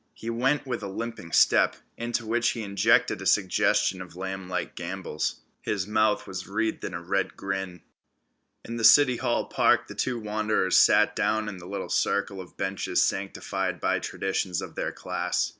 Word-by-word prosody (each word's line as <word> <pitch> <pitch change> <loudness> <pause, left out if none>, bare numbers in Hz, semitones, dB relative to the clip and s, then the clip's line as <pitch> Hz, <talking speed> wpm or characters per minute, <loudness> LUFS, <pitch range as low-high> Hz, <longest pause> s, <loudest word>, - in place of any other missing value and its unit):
He 115 - -5
went 135 +5 +1
with 125 -3 -3
a 100 - -4
limping 100 -3 -6
step, - - +4 0.2
into 120 0 -3
which 120 +2 +1
he 115 - -5
injected 100 +3 +2
a - - -2
suggestion 95 0 +2
of 90 -2 -10
lamblike 95 -1 -4
gambols. 85 -3 -4 0.2
His 100 -3 -2
mouth 110 0 +1
was 95 -2 -6
wreathed 110 +3 -2
in - - -4
a 85 - -5
red 95 +2 -1
grin. 95 -3 -4 0.8
In 115 - -5
the 115 - -3
City 130 0 +7
Hall - - 0
Park - - +3
the - - -8
two 130 -2 -1
wanderers 105 -3 0
sat - - +5
down 110 0 0
in 100 -3 -5
the 85 - -11
little 100 +1 -4
circle 100 -1 0
of 90 - -14
benches 95 0 0
sanctified 95 0 -3
by - - +1
traditions 95 -2 -2
of - - -7
their - - -3
class. - - -2
100 Hz, 175 wpm, -27 LUFS, 95-115 Hz, 0.8 s, City